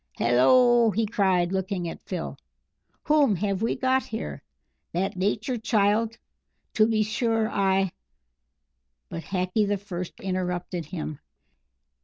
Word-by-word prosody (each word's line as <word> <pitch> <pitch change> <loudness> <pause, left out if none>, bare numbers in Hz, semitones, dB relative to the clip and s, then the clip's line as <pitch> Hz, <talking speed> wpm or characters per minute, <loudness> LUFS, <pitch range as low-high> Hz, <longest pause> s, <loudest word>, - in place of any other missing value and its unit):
"Hallo," 235 - +5
he 220 +2 0
cried, 190 -4 +1
looking 190 -2 -2
at 165 - -7
Phil, 180 -3 -4 0.7
"whom 295 -8 +3
have 195 +1 -1
we 230 - +1
got 260 0 +1
here? 75 -2 -5 0.5
That 185 +3 -1
Nature 210 +6 -1
child? 220 0 +1 0.6
To 215 0 +4
be 220 -1 +2
sure. 225 +1 0
I 195 -2 +1 0.6
" 65 0 -53
But 165 - -4
Hackee 190 +2 0
the 205 0 +1
First 185 -3 -7
interrupted 180 -2 -3
him. 155 -2 -6
195 Hz, 125 wpm, -26 LUFS, 175-220 Hz, 0.7 s, Hallo